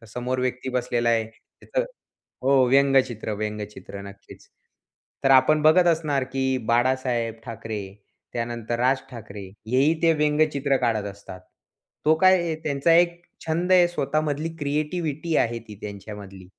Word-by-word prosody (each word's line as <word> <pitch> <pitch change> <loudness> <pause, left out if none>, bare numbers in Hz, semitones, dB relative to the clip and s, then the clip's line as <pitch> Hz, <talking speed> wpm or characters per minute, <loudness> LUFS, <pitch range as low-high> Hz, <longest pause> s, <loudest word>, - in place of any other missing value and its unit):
तर 115 - -16
समोर 125 +3 -3
व्यक्ती 125 0 -2
बसलेला 120 -1 0
आहे, 115 -1 +2
त्याचं - - -5 0.6
हो 135 +1 +3
व्यंगचित्र, 135 -5 +2
व्यंगचित्र, 105 -2 -6
नक्कीच. 100 0 -13 0.8
तर 135 - +4
आपण 150 +3 +5
बघत 165 +3 +5
असणार 155 -5 +1
की 130 0 0
बाळासाहेब 120 -1 +1
ठाकरे, 110 -2 -5 0.5
त्यानंतर 120 0 -3
राज 130 +2 +3
ठाकरे, 105 -4 -9 0.3
हेही 140 +5 +3
ते 165 -1 +5
व्यंगचित्र 150 -2 +1
काढत 110 -3 0
असतात. 100 -2 -11 0.6
तो 155 - +5
काय 185 +1 +6
आहे 170 -2 -1
त्यांचा 145 +3 +2
एक 170 0 +3 0.2
छंद 170 +3 0
आहे 180 -1 +6
स्वतःमधली 155 -1 -1
क्रिएटिव्हिटी 155 +2 -2
आहे 120 0 +1
ती 105 - -8
त्यांच्यामधली, 100 -2 -9
130 Hz, 135 wpm, -24 LUFS, 115-155 Hz, 0.8 s, काय